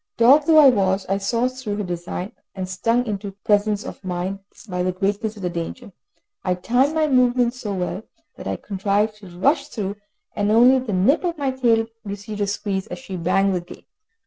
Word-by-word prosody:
Dog 275 +6 +6
though 320 -1 +6
I 295 -3 +9
was, 195 -4 +1
I 195 0 +1
saw 230 +5 +1
through 255 -5 -4
her 210 - -2
design, 180 +1 -5 0.2
and 190 -1 -4
stung 230 +6 0
into 200 -2 -4
presence 205 0 +2
of - - -8
mind 185 +1 -3 0.3
by 180 -2 -2
the 185 +1 +1
greatness 205 +4 -1
of 200 - -10
the 180 - 0
danger, 180 +7 -6 0.5
I 180 -1 +1
timed 250 - +1
my 315 -1 +3
movements 250 -2 +2
so 210 -5 -3
well 185 +2 -3 0.3
that - - -8
I - - -1
contrived 205 +2 -1
to 205 -2 -13
rush 275 - +1
through, 205 -7 -4 0.4
and 205 0 0
only 245 +4 +6
the 250 -4 -5
tip 200 - +3
of 345 -2 -1
my 275 -2 0
tail 235 -4 +2 0.2
received 205 0 -6
a 205 - +1
squeeze 200 -1 -2
as - - -6
she 225 -8 -8
banged 190 +3 +2
the 180 - -1
gate. 175 - -13
205 Hz, 200 wpm, -22 LUFS, 190-245 Hz, 0.5 s, I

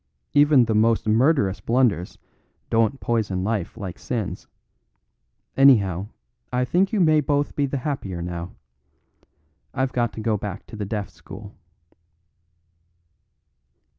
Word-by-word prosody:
Even 145 -3 +5
the 110 - 0
most 110 +1 +2
murderous 110 -3 +2
blunders 115 -7 +1 0.5
don't 115 +4 +2
poison 105 -6 -1
life 105 -1 -2
like 95 -5 -6
sins; 115 -6 -4 1.1
anyhow, 100 -9 +4 0.4
I 125 0 +1
think 180 +9 +1
you 215 - 0
may 155 -3 +5
both 145 0 0
be 145 -1 +1
the 140 - -2
happier 125 - -4
now. 85 +1 -6 1.2
I've 130 -1 -1
got 120 -3 0
to - - -7
go 110 -1 0
back 100 -1 -6
to - - -11
the 105 -1 -4
Deaf 105 0 -4
School." - - -12
115 Hz, 125 wpm, -23 LUFS, 100-135 Hz, 1.2 s, Even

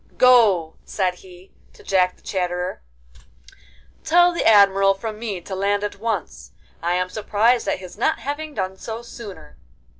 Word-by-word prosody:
'Go,' 210 -11 +4
said 185 -3 -1
he, 185 0 -16 0.2
to - - -18
Jack 180 -2 +1
the - - -28
Chatterer, 180 -1 -3 1.2
'tell 350 +2 +5
the 340 - -1
Admiral 195 -2 +5
from 215 +2 -6
me 215 -5 -4
to 190 - -8
land 200 +2 0
at 205 -1 -5
once. 190 - -4 0.3
I 170 +1 0
am 180 0 0
surprised 220 +4 +1
at - - 0
his 185 +2 -12
not 315 - +1
having 295 +2 -5
done 190 -1 -3
so 225 +3 -7
sooner. 195 -10 -11
200 Hz, 155 wpm, -22 LUFS, 180-230 Hz, 1.2 s, tell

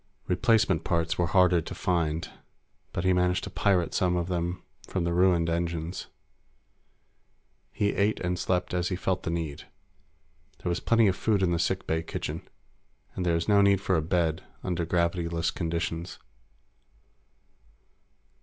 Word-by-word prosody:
Replacement 95 -3 +2
parts 85 -2 0
were 85 - +2
harder 90 0 +4
to - - -7
find, 85 -3 0 0.6
but 85 - -3
he 95 0 +3
managed 90 +1 +1
to - - -6
pirate 95 -4 +1
some 90 -1 +2
of 85 0 -1
them 90 0 -2 0.2
from 95 - -2
the 85 0 0
ruined 90 -2 +3
engines. 85 +1 -2 1.6
He 100 -1 0
ate 105 +2 +1
and 90 -1 -1
slept 90 -1 -1
as 90 -1 0
he 90 - -1
felt 95 0 -1
the - - -4
need. 80 -4 -4 1.0
There 90 - 0
was 85 - -1
plenty 115 -1 +3
of 95 -2 +3
food 105 -3 +1
in 90 - +2
the 85 - +1
sick 95 +3 0
bay 80 0 0
kitchen, 80 - -5 0.7
and 90 -1 -2
there 85 - +3
is 85 - -1
no 100 -1 +5
need 100 -1 +4
for 95 -1 0
a 80 - +2
bed 80 0 0 0.2
under 85 -2 -1
gravity 85 0 0
less 85 0 0
conditions. 85 0 -3
90 Hz, 160 wpm, -28 LUFS, 85-95 Hz, 1.6 s, no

